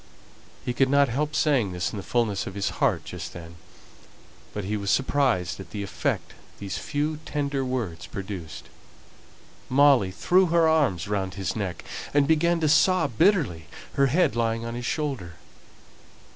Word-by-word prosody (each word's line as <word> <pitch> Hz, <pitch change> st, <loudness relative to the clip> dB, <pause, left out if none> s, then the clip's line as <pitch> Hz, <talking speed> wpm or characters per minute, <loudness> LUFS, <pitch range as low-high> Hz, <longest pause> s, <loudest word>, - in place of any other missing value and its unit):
He 125 Hz, -, -1 dB
could 130 Hz, +1 st, +2 dB
not 140 Hz, -1 st, +4 dB
help 150 Hz, +5 st, -1 dB
saying 130 Hz, -13 st, +2 dB
this 90 Hz, 0 st, -2 dB
in -, -, -4 dB
the -, -, -4 dB
fulness 110 Hz, -3 st, -1 dB
of 95 Hz, -, -7 dB
his 100 Hz, -1 st, -1 dB
heart -, -, +2 dB
just 85 Hz, -2 st, -7 dB
then, 85 Hz, -1 st, -10 dB, 0.9 s
but 105 Hz, -, -4 dB
he 105 Hz, +3 st, -2 dB
was 100 Hz, -1 st, -3 dB
surprised 130 Hz, -11 st, +1 dB
at 95 Hz, -3 st, -9 dB
the 105 Hz, -1 st, -5 dB
effect 100 Hz, -, -2 dB, 0.2 s
these 100 Hz, -2 st, -5 dB
few 150 Hz, 0 st, -2 dB
tender 140 Hz, -2 st, -2 dB
words 120 Hz, -11 st, -3 dB
produced. 95 Hz, -6 st, -7 dB, 1.0 s
Molly 135 Hz, -7 st, +5 dB
threw 180 Hz, -, +3 dB
her 165 Hz, -1 st, +4 dB
arms 140 Hz, -, +2 dB
round 95 Hz, -2 st, -2 dB
his 95 Hz, -2 st, -3 dB
neck, 95 Hz, -5 st, -4 dB, 0.3 s
and 145 Hz, -1 st, +5 dB
began 170 Hz, +2 st, +3 dB
to 155 Hz, -, +2 dB
sob 165 Hz, 0 st, +4 dB
bitterly, 145 Hz, -, +2 dB, 0.3 s
her 140 Hz, 0 st, +3 dB
head 145 Hz, -3 st, +2 dB
lying 115 Hz, 0 st, 0 dB
on 115 Hz, -, -4 dB
his 120 Hz, 0 st, -4 dB
shoulder. 135 Hz, -, -3 dB
120 Hz, 160 wpm, -25 LUFS, 95-145 Hz, 1.0 s, Molly